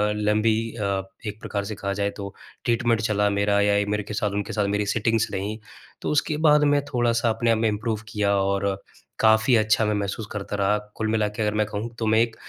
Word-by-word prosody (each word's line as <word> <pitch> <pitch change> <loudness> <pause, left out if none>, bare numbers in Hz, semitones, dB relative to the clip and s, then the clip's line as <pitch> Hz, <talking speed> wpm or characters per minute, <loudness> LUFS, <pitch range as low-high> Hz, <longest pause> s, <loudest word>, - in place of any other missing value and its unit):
लंबी 105 +1 +2 0.2
अ, 100 -3 -1 0.3
एक 105 +1 -5
प्रकार 100 -1 -3
से 105 - -5
कहा 100 0 -3
जाए, 100 0 0
तो 100 -1 -7 0.3
ट्रीटमेंट 115 -1 +2
चला 105 -2 +1
मेरा 100 0 +2
या 100 0 +3
ए 100 - +1
मेरे 105 0 -1
के 105 - -7
साथ 105 0 0
उनके - - -7
साथ 105 -2 0
मेरी 105 - 0
सिटिंग्स 115 0 +1
रही, 105 +3 -3 0.4
तो - - -2
उसके 150 0 +1
बाद 150 0 +5
मैं 145 - +2
थोड़ा-सा 120 -1 +2
अपने 115 +1 +1
आप 115 - +3
में 115 +1 +1
इम्प्रूव 110 +1 -2
किया 105 -2 +1
और 100 0 0 0.4
काफ़ी 110 +3 +4
अच्छा 110 0 +3
मैं 105 - +1
महसूस 100 +2 -3
करता 105 0 -4
रहा। 100 +1 +2 0.2
कुल 110 - -2
मिला 110 -1 +1
के 105 +2 -5
अगर 105 -1 +1
मैं 105 0 +2
कहूँ, 105 +3 -4
तो 115 - -1
मैं 110 +1 +4
एक 115 -1 0
105 Hz, 225 wpm, -24 LUFS, 100-115 Hz, 0.4 s, बाद